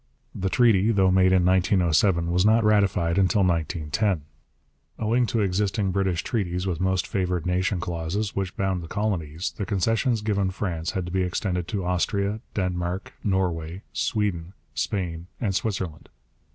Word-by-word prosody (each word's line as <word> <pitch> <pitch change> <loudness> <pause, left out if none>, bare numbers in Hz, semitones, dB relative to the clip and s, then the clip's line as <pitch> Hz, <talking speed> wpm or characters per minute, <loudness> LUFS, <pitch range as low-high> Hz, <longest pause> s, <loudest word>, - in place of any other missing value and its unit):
The 95 0 -2
treaty, 115 -2 +4
though 95 -3 +3
made 95 0 +4
in 95 -2 +4
1907, 90 -1 +3
was 90 +1 +3
not 110 +2 +4
ratified 100 -5 +2
until 95 +1 +3
1910. 85 +1 0 0.7
Owing 115 +2 +1
to 115 - 0
existing 100 +1 0
British 95 -2 0
treaties 90 -6 -2
with 90 -4 -2
most 95 -1 +1
favoured 90 -5 -1
nation 90 +1 0
clauses 85 +5 -3
which 95 -2 -3
bound 95 -2 0
the 85 - -8
colonies, 90 -5 -2
the - - 0
concessions 110 +5 +1
given 100 -3 +1
France 90 -4 -3
had 95 -2 -2
to 90 - -6
be 95 +1 +1
extended 90 -1 -1
to 100 -3 -3
Austria, 100 +3 0 0.2
Denmark, 90 -1 -2
Norway, 90 -2 -1
Sweden, 95 -5 -1 0.2
Spain, 85 -4 -3
and 105 -5 -1
Switzerland. 95 -4 -3
95 Hz, 150 wpm, -25 LUFS, 90-100 Hz, 0.7 s, treaty